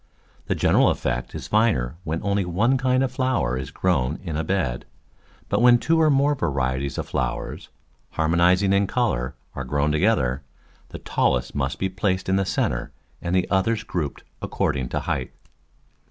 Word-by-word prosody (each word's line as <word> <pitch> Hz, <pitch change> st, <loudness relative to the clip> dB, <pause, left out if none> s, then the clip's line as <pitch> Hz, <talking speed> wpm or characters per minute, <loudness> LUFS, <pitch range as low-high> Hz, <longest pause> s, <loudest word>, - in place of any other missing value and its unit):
The -, -, 0 dB
general -, -, +4 dB
effect 60 Hz, 0 st, -2 dB
is -, -, -6 dB
finer 105 Hz, -, +1 dB
when 80 Hz, -1 st, -3 dB
only 100 Hz, -1 st, +1 dB
one 100 Hz, +9 st, +1 dB
kind 130 Hz, 0 st, +2 dB
of 130 Hz, -, -1 dB
flower 130 Hz, -, 0 dB
is 65 Hz, 0 st, -4 dB
grown 75 Hz, -6 st, 0 dB
in 85 Hz, -5 st, -4 dB
a 80 Hz, -, -1 dB
bed, 80 Hz, -9 st, -1 dB, 0.6 s
but -, -, 0 dB
when 120 Hz, 0 st, +7 dB
two 160 Hz, +6 st, +2 dB
or 155 Hz, -, +5 dB
more 140 Hz, +1 st, +3 dB
varieties 70 Hz, -, -1 dB
of -, -, -3 dB
flowers, 60 Hz, -1 st, -3 dB, 0.5 s
harmonis 85 Hz, +4 st, +3 dB
ing 100 Hz, 0 st, +3 dB
in 100 Hz, 0 st, +3 dB
colour, 70 Hz, -, -1 dB, 0.2 s
are 65 Hz, -, -4 dB
grown 70 Hz, +3 st, 0 dB
together, 75 Hz, -, +1 dB, 0.5 s
the -, -, -7 dB
tallest 60 Hz, -1 st, 0 dB
must -, -, -2 dB
be 95 Hz, -, 0 dB
placed 95 Hz, 0 st, -1 dB
in 95 Hz, -, +2 dB
the 95 Hz, 0 st, +1 dB
centre -, -, -1 dB, 0.3 s
and 85 Hz, +1 st, -1 dB
the 90 Hz, -, +2 dB
others 110 Hz, +3 st, +1 dB
grouped 80 Hz, -9 st, -4 dB, 0.2 s
according 65 Hz, -4 st, -1 dB
to -, -, -2 dB
height. 65 Hz, -1 st, -3 dB
90 Hz, 170 wpm, -23 LUFS, 65-110 Hz, 0.6 s, when